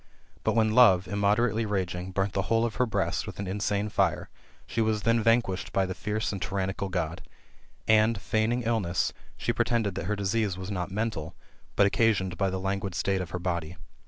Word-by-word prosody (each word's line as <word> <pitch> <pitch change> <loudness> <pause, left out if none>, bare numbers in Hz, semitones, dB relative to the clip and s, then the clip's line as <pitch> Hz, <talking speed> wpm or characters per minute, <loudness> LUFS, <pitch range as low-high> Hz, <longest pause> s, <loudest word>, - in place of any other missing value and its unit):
But - - +1
when 110 -1 +3
love, 95 -7 +6
immoderately 105 +3 +1
raging, 95 -3 -2
burnt 95 +1 -1
the 100 - +1
whole 115 0 +3
of 115 -3 -4
her 125 +1 +2
breast 100 -6 -1
with - - -7
an 100 - -4
insane 100 +2 -1
fire, - - 0 0.4
she 115 - -2
was 110 -2 0
then 115 0 +3
vanquished 115 -4 +1
by 95 - +2
the 95 - -3
fierce 105 +3 -2
and 100 -2 -5
tyran 95 -1 -1
nical 100 0 -4
God; 85 -2 -2 0.7
and, 110 0 +4
feigning 110 +4 0
illness, 105 -7 0 0.2
she - - -1
pretended 115 -5 +1
that 85 - -4
her 105 +2 0
disease 100 -1 0
was 95 +1 -6
not 90 -2 -2
mental, 95 -6 -3 0.4
but 100 - +5
occasioned 100 -3 +2
by 100 0 +1
the 95 0 -3
languid 95 -1 -2
state 95 0 0
of 90 - -5
her 90 - -3
body. 85 -2 -3
100 Hz, 195 wpm, -28 LUFS, 95-110 Hz, 0.7 s, love